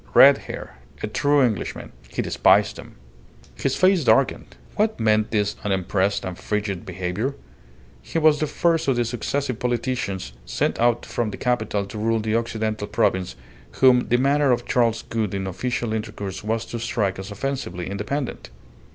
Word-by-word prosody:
Red -, -, +8 dB
hair. 60 Hz, -, -7 dB, 0.3 s
A -, -, +2 dB
true 145 Hz, +5 st, +2 dB
Englishman. 115 Hz, -5 st, -2 dB, 0.2 s
He -, -, -2 dB
despised -, -, +3 dB
him. -, -, -12 dB, 0.6 s
His -, -, -1 dB
face 185 Hz, -3 st, +4 dB
darkened. 120 Hz, -, +2 dB, 0.2 s
What 215 Hz, +1 st, +1 dB
meant 110 Hz, -1 st, +2 dB
this 105 Hz, -2 st, 0 dB
unimpressed 95 Hz, 0 st, 0 dB
and 95 Hz, -1 st, -4 dB
frigid 105 Hz, -4 st, -3 dB
behaviour? 95 Hz, +9 st, -2 dB, 0.7 s
He 165 Hz, -, -4 dB
was 155 Hz, -2 st, +4 dB
the 155 Hz, -, 0 dB
first 165 Hz, +2 st, +1 dB
of 135 Hz, -, +3 dB
the 120 Hz, 0 st, +1 dB
successive 125 Hz, +2 st, -2 dB
politicians 120 Hz, -, -2 dB
sent -, -, -1 dB
out 120 Hz, 0 st, +2 dB
from 120 Hz, -2 st, -2 dB
the -, -, -6 dB
capital 110 Hz, -5 st, 0 dB
to 105 Hz, +2 st, -7 dB
rule 115 Hz, +1 st, +1 dB
the 110 Hz, 0 st, -1 dB
Occidental 110 Hz, -2 st, -2 dB
Province 100 Hz, -4 st, 0 dB, 0.4 s
whom 125 Hz, -2 st, +5 dB
the 120 Hz, -, +3 dB
manner 140 Hz, +1 st, +3 dB
of 120 Hz, -, +1 dB
Charles 115 Hz, -2 st, +1 dB
Gould 110 Hz, -3 st, -2 dB
in 95 Hz, -1 st, -2 dB
official 120 Hz, +4 st, -2 dB
intercourse 105 Hz, -3 st, -5 dB
was 110 Hz, +1 st, -1 dB
to 120 Hz, -, -5 dB
strike 105 Hz, -5 st, -1 dB
as 95 Hz, +2 st, -6 dB
offensively 105 Hz, -6 st, -4 dB
independent. 105 Hz, +8 st, -4 dB
110 Hz, 160 wpm, -23 LUFS, 100-125 Hz, 0.7 s, Red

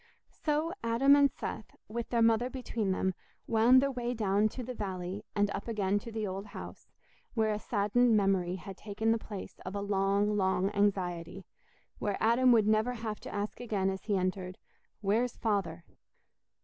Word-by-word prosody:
So 310 Hz, +2 st, -1 dB
Adam 240 Hz, +5 st, +5 dB
and 285 Hz, -1 st, +5 dB
Seth, 215 Hz, -, -6 dB
with 235 Hz, +2 st, -4 dB
their 235 Hz, -1 st, +2 dB
mother 230 Hz, +2 st, +3 dB
between 240 Hz, -6 st, -3 dB
them, 190 Hz, 0 st, 0 dB, 0.3 s
wound 235 Hz, +4 st, +5 dB
their 275 Hz, -, +1 dB
way 245 Hz, -1 st, -3 dB
down 210 Hz, -1 st, +2 dB
to 250 Hz, -, -6 dB
the 250 Hz, +2 st, -5 dB
valley 190 Hz, -2 st, -4 dB
and 205 Hz, -1 st, +2 dB
up 200 Hz, +3 st, -5 dB
again 205 Hz, -3 st, 0 dB
to 230 Hz, -, -9 dB
the 220 Hz, -1 st, -2 dB
old 195 Hz, +1 st, -5 dB
house, 200 Hz, -, -9 dB, 0.5 s
where 220 Hz, -2 st, +2 dB
a 210 Hz, -, -1 dB
saddened 220 Hz, +2 st, +2 dB
memory 190 Hz, -3 st, +1 dB
had 190 Hz, +1 st, -9 dB
taken 220 Hz, +2 st, -1 dB
the 230 Hz, -, +2 dB
place 205 Hz, -3 st, -8 dB
of 185 Hz, +2 st, -6 dB
a -, -, -1 dB
long, 200 Hz, +1 st, +1 dB
long 190 Hz, 0 st, +1 dB
anxiety—where 195 Hz, 0 st, -3 dB
Adam 240 Hz, +3 st, +4 dB
would 225 Hz, -3 st, +5 dB
never 215 Hz, +3 st, +2 dB
have 220 Hz, -3 st, -5 dB
to -, -, -9 dB
ask 205 Hz, +1 st, -4 dB
again 205 Hz, -5 st, 0 dB
as 190 Hz, -, -7 dB
he 205 Hz, -3 st, +1 dB
entered, 185 Hz, 0 st, -2 dB, 0.4 s
"Where's 225 Hz, +4 st, +1 dB
Father?" 190 Hz, -7 st, -1 dB
210 Hz, 175 wpm, -31 LUFS, 195-230 Hz, 0.5 s, Adam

